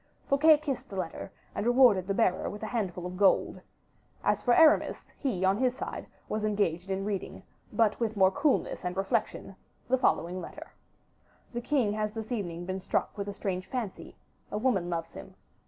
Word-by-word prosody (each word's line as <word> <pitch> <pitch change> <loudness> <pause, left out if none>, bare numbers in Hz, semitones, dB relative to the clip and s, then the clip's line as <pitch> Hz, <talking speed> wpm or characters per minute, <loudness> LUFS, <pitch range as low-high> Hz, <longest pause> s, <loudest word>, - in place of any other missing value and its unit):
Fouquet 300 +3 +6
kissed 290 -4 -4
the 195 - -8
letter, 185 +1 -4 0.2
and - - -2
rewarded 240 -6 +5
the 195 - 0
bearer 190 -5 +1
with 210 +1 -8
a - - -1
handful 195 -6 -3
of 180 0 -6
gold. 195 0 +3 0.6
As - - +1
for 245 -1 +3
Aramis, 315 -2 +4
he, 200 -10 0
on 195 +3 +2
his 255 0 +1
side, - - -5 0.2
was 215 0 -2
engaged 195 -4 0
in 195 0 -2
reading, 205 -2 -4 0.3
but 220 -3 +2
with 220 -2 -1
more 190 -1 +5
coolness 285 +2 +1
and 180 +1 -3
reflection, 195 0 -1 0.3
the 260 +1 +2
following 180 -5 +1
letter: - - -10 0.8
"The 240 - -3
king 245 -5 +1
has 215 0 -2
this 225 +1 -6
evening 175 -7 -3
been 190 +1 -3
struck - - -1
with 200 -1 -4
a 200 - -4
strange 185 -2 -3
fancy; 235 -7 -5 0.4
a - - -2
woman 210 -7 +1
loves 165 -1 -3
him. - - -11
205 Hz, 185 wpm, -29 LUFS, 185-245 Hz, 0.8 s, Fouquet